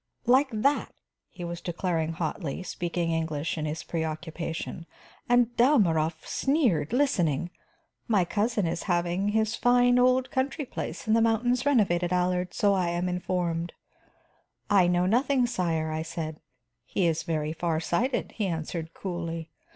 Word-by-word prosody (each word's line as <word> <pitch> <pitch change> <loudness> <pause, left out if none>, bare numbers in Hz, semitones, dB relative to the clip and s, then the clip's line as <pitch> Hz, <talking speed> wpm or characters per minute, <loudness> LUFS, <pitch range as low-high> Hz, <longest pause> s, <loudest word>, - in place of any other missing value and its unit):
"Like 260 +4 +4
that," 255 +7 0 0.3
he 175 - -9
was 170 0 -5
declaring 170 -2 -1
hotly, 160 0 -3
speaking 175 -1 -2
English 160 -1 -1
in 155 -2 -3
his 155 +1 -4
preoccupation, 165 +1 -4 0.4
"and 245 -1 +3
Dalmorov 170 - +3
sneered, 250 - +1
listening. 175 - +1 0.6
'My 205 -6 +3
cousin 210 +2 0
is 165 +1 -2
having 175 +2 +1
his 220 +1 +1
fine 245 +1 +4
old 255 +1 +3
country 275 +3 -1
place 240 - -6
in 220 - +3
the 230 - +4
mountains 245 +3 +2
renovated, 180 -10 +2
Allard, 180 0 +1
so 205 -1 +2
I 185 -3 +1
am 175 +1 -1
informed.' 180 -2 -2 1.0
'I 190 -3 +5
know 175 0 +2
nothing, 250 +5 +2
sire,' 165 -9 -1
I 155 0 -2
said. 160 -1 -5 0.4
'He 175 +8 -1
is 165 -1 +1
very 155 -1 -2
far 165 -1 -1
sighted,' 235 - -1
he 210 -3 -2
answered 165 -1 -4
coolly. 170 -3 -5
180 Hz, 145 wpm, -27 LUFS, 165-230 Hz, 1.0 s, I